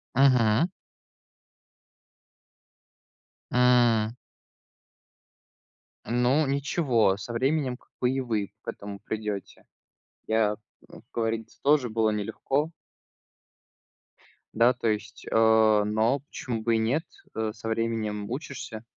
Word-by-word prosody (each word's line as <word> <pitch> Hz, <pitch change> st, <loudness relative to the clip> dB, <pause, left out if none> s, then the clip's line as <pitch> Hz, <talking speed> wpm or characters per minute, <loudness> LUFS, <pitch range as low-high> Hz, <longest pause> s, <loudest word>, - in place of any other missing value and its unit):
Мгм. 125 Hz, +2 st, +4 dB, 2.8 s
М. 120 Hz, -3 st, +4 dB, 1.9 s
Ну 125 Hz, +6 st, +2 dB
ничего, 135 Hz, -, +1 dB
со 100 Hz, +4 st, -7 dB
временем, 130 Hz, +1 st, 0 dB
как -, -, -29 dB
бы, 125 Hz, -, +2 dB
и 135 Hz, +1 st, 0 dB
вы 110 Hz, -5 st, -2 dB
к -, -, -36 dB
этому 100 Hz, 0 st, -7 dB
придёте. 105 Hz, -2 st, -5 dB, 0.6 s
Я, 110 Hz, -1 st, +2 dB, 0.3 s
м, -, -, -13 dB
говорится, 115 Hz, -1 st, -3 dB
тоже 140 Hz, -3 st, +3 dB
было 110 Hz, 0 st, +2 dB
нелегко. 110 Hz, +8 st, -1 dB, 1.8 s
Да, 120 Hz, +3 st, +4 dB
то 120 Hz, -2 st, -3 dB
есть, 105 Hz, +2 st, -4 dB
э, -, -, -2 dB, 0.5 s
но 110 Hz, +6 st, +1 dB
почему 125 Hz, -4 st, -5 dB
бы 115 Hz, 0 st, +2 dB
и -, -, +3 dB
нет? 125 Hz, +9 st, +1 dB, 0.3 s
Э, 110 Hz, -1 st, -1 dB
со 110 Hz, 0 st, -6 dB
временем 110 Hz, -2 st, -2 dB
учишься. 125 Hz, -4 st, -6 dB
115 Hz, 100 wpm, -27 LUFS, 110-130 Hz, 2.8 s, Мгм